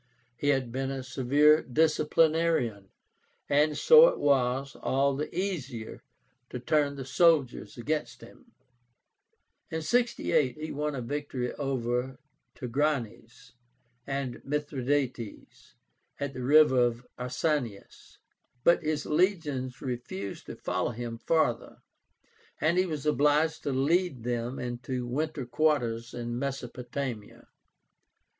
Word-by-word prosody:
He 145 Hz, -, -3 dB
had 135 Hz, -4 st, +1 dB
been 135 Hz, +2 st, -2 dB
a 135 Hz, -1 st, -4 dB
severe 140 Hz, +4 st, +4 dB
disciplinarian, 155 Hz, -, +1 dB, 0.6 s
and 150 Hz, +1 st, +2 dB
so 475 Hz, -, +8 dB
it -, -, 0 dB
was 135 Hz, -1 st, +1 dB
all 140 Hz, +1 st, +1 dB
the 150 Hz, +2 st, -3 dB
easier 140 Hz, -, -4 dB, 0.5 s
to 125 Hz, -, -5 dB
turn 145 Hz, +2 st, +1 dB
the 135 Hz, -2 st, -6 dB
soldiers 135 Hz, -7 st, +2 dB
against 150 Hz, +6 st, -3 dB
him. -, -, -16 dB, 1.2 s
In 160 Hz, -1 st, -3 dB
68 235 Hz, -, +1 dB
he 155 Hz, +1 st, -5 dB
won 150 Hz, 0 st, -2 dB
a 125 Hz, -, -4 dB
victory 135 Hz, -1 st, -3 dB
over 130 Hz, -2 st, -2 dB, 0.4 s
Tigránes 125 Hz, -3 st, -3 dB, 0.6 s
and 135 Hz, -3 st, -3 dB
Mithradátes, 135 Hz, -5 st, -3 dB, 0.4 s
at 140 Hz, -1 st, -3 dB
the 130 Hz, -, -6 dB
river 125 Hz, -4 st, +4 dB, 0.2 s
Arsanias; 125 Hz, -4 st, -3 dB, 0.5 s
but 170 Hz, 0 st, +5 dB
his 155 Hz, -2 st, -2 dB
legions 150 Hz, -7 st, 0 dB
refused 120 Hz, -7 st, -5 dB
to -, -, -7 dB
follow -, -, -2 dB
him 115 Hz, 0 st, -6 dB
farther, 140 Hz, -7 st, 0 dB, 0.8 s
and 170 Hz, +3 st, +2 dB
he 185 Hz, -, +2 dB
was 150 Hz, -4 st, -4 dB
obliged 150 Hz, +2 st, +2 dB
to 140 Hz, -, -2 dB
lead 140 Hz, 0 st, +1 dB
them 120 Hz, +1 st, -2 dB
into 125 Hz, +1 st, -4 dB
winter 145 Hz, +2 st, -2 dB
quarters 120 Hz, -4 st, 0 dB
in 120 Hz, 0 st, -4 dB
Mesopotamia. 125 Hz, -3 st, -5 dB
135 Hz, 110 wpm, -28 LUFS, 125-150 Hz, 1.2 s, so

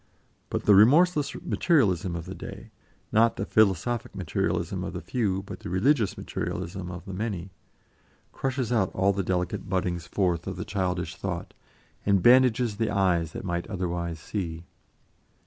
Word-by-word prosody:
But -, -, -2 dB
the 105 Hz, -, +6 dB
remorseless 150 Hz, -, +5 dB
materialism 95 Hz, -, +2 dB
of 85 Hz, -1 st, -5 dB
the 95 Hz, -, -6 dB
day -, -, -9 dB, 0.4 s
not 115 Hz, +1 st, +4 dB
the 100 Hz, -, -3 dB
philosophic 110 Hz, +4 st, +1 dB
materialism 90 Hz, -6 st, -1 dB
of -, -, -5 dB
the -, -, -4 dB
few, 95 Hz, -6 st, -1 dB
but 95 Hz, -2 st, -8 dB
the -, -, -7 dB
religious 105 Hz, +5 st, +2 dB
materialism 90 Hz, +1 st, -4 dB
of 90 Hz, +1 st, -8 dB
the 95 Hz, -, -7 dB
many 95 Hz, -2 st, -4 dB, 0.8 s
crushes 130 Hz, -3 st, -2 dB
out 110 Hz, -6 st, +2 dB
all 95 Hz, +2 st, +3 dB
the 100 Hz, -, -1 dB
delicate 90 Hz, 0 st, -2 dB
buddings 90 Hz, -3 st, -1 dB
forth 90 Hz, -2 st, 0 dB
of 95 Hz, -, -3 dB
the 90 Hz, -, -5 dB
childish 90 Hz, -3 st, -2 dB
thought, -, -, -4 dB, 0.5 s
and 100 Hz, -3 st, +2 dB
bandages 125 Hz, -3 st, +5 dB
the 115 Hz, -1 st, 0 dB
eyes 90 Hz, -5 st, +1 dB
that -, -, -6 dB
might 85 Hz, -1 st, -2 dB
otherwise 85 Hz, -4 st, -3 dB
see. 85 Hz, -2 st, -5 dB
95 Hz, 155 wpm, -27 LUFS, 90-110 Hz, 0.8 s, the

